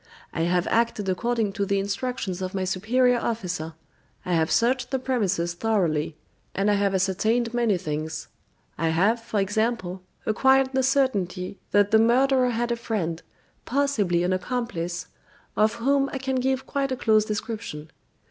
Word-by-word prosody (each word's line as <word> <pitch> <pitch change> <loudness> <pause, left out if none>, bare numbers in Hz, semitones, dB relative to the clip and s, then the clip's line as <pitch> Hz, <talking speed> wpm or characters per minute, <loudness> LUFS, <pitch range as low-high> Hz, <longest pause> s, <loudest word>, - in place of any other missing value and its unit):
I - - -2
have 180 0 +2
acted 230 -3 +1
according 225 +1 0
to 200 - -1
the 200 0 +1
instructions 200 -1 -3
of 185 +1 -4
my 190 - 0
superior 240 +7 +2
officer; 180 -9 -3 0.5
I 180 - -1
have 160 -1 +2
searched 250 +2 +2
the 265 - 0
premises 200 -10 0
thoroughly, 170 -7 0 0.4
and 200 +2 +2
I - - +3
have 200 -1 +1
ascertained 220 +5 +1
many 235 -5 +2
things. 155 -1 -4 0.5
I 165 0 +1
have, 200 +8 +2
for 220 -2 -2
example, 200 -2 -1 0.2
acquired 265 +4 +3
the 265 - +2
certainty 200 -9 0
that 205 0 +3
the 220 - +6
murderer 255 +2 +4
had 240 0 -1
a - - +2
friend, 175 -8 -2 0.4
possibly 225 -11 +1
an 180 +1 +1
accomplice, 185 -4 -3 0.5
of 215 0 +3
whom 275 +3 +2
I - - -3
can 265 0 -2
give 265 +1 0
quite 275 -1 -1
a 260 - -1
close 215 -3 +3
description. 215 -7 -5
215 Hz, 155 wpm, -25 LUFS, 180-245 Hz, 0.5 s, the